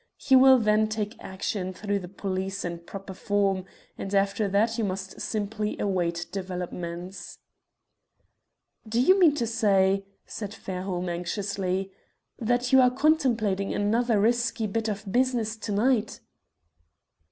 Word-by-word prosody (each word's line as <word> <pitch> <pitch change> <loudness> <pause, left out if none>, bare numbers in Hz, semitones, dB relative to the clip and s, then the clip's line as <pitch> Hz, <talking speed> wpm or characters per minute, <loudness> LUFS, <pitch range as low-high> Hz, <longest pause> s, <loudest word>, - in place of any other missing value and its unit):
He 265 - +3
will 260 0 +8
then 215 -1 +3
take 215 0 -3
action 190 0 -3
through 205 +1 -2
the 180 - -8
police 190 0 -3
in 170 -1 -4
proper 195 +3 -9
form, 195 -1 0 0.3
and 195 +1 -3
after 200 +1 +2
that 220 +4 +1
you - - +1
must 190 -1 -4
simply 210 0 -2
await 175 -3 -1
developments." 180 -1 -6 1.5
"Do 230 +2 +1
you 370 +10 +5
mean 325 -6 +6
to 240 - 0
say," 195 -3 +2 0.2
said 210 0 -6
Fairholme, 185 -2 -4
anxiously, 190 +2 -2 0.5
"that 245 +2 0
you 265 - +8
are 250 - +6
contemplating 245 -9 +1
another 225 +2 +2
risky 235 +1 +1
bit 225 +2 -2
of 205 -1 -5
business 240 -2 +1
to 220 -1 -5
night?" 220 +1 +1
205 Hz, 130 wpm, -26 LUFS, 190-230 Hz, 1.5 s, will